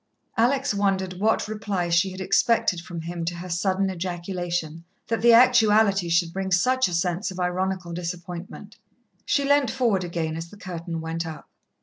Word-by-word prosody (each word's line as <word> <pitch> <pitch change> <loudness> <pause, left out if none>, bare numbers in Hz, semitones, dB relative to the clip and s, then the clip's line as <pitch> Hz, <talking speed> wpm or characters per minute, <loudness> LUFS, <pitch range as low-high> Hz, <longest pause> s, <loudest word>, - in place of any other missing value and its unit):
Alex 265 +3 +2
wondered 190 -2 -1
what 220 +2 +1
reply 210 -4 -2
she 170 +3 +2
had 185 0 -8
expected 190 0 +2
from 170 -1 -7
him 170 +1 -5
to 170 +1 -2
her 180 +1 -7
sudden 190 +2 +1
ejaculation, 175 -2 -4 0.3
that 230 - 0
the 235 +1 +6
actuality 220 -6 +5
should 170 0 +1
bring 190 0 -3
such 255 +8 +3
a 180 - -5
sense 175 +4 -1
of 185 -1 -8
ironical 180 0 -2
disappointment. 180 +4 -7 0.5
She 285 - +2
leant 285 -2 +3
forward 225 -7 +1
again 165 -2 -3
as 165 +1 -6
the 205 - -14
curtain 170 -3 -6
went 165 +1 -3
up. 160 -1 -9
185 Hz, 165 wpm, -24 LUFS, 170-210 Hz, 0.5 s, the